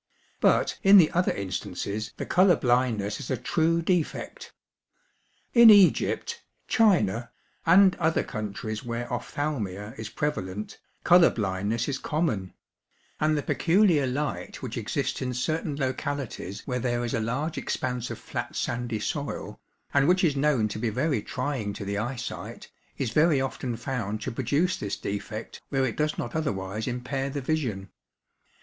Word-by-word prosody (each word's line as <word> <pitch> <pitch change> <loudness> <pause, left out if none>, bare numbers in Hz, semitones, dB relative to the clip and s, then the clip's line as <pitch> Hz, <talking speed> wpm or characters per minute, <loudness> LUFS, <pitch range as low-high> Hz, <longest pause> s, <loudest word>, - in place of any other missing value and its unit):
But - - +2
in 195 +1 +8
the 165 -5 +6
other 180 +1 +2
instances 100 +2 -4
the - - -4
colour 185 0 +5
blindness 120 -5 +1
is 135 - -7
a 130 - 0
true 165 +7 +1
defect. 175 -2 -2 1.0
In 235 -2 +9
Egypt, 215 - +4 0.3
China, 120 - +3 0.4
and 190 +2 +7
other 160 -1 +1
countries 110 0 -5
where 120 0 -3
ophthalmia 110 -6 -3
is 110 -1 -5
prevalent, 105 -7 -3 0.2
colour 175 -1 +7
blindness 105 +3 -1
is 135 -2 -2
common; 120 - -2 0.6
and 155 0 +2
the 145 - -1
peculiar 170 -6 +3
light 145 +3 -3
which - - -4
exists - - -2
in 125 -1 -2
certain 155 +3 -1
localities 130 - -3
where 125 -2 -2
there 120 -1 -1
is 120 - -3
a - - +1
large 135 +9 -2
expanse 125 -3 -3
of - - -5
flat - - -5
sandy 120 -2 -2
soil, 140 +5 -4 0.3
and 140 0 +4
which 185 +1 +3
is 155 -5 +3
known 135 -6 +2
to 105 - -5
be 115 0 0
very 130 +2 0
trying 125 -5 -3
to 100 - -6
the 100 +1 -2
eyesight, 125 +2 -5 0.3
is 125 -5 -2
very 155 +2 +4
often 130 -2 -3
found 110 -3 -3
to - - -4
produce 145 +9 0
this 100 - -4
defect 105 +2 -5
where 135 -1 +1
it 120 - -2
does 150 0 0
not 120 - -4
otherwise 105 -8 -2
impair 130 +2 -2
the 140 +1 -3
vision. 125 -10 -2
130 Hz, 150 wpm, -27 LUFS, 110-155 Hz, 1.0 s, In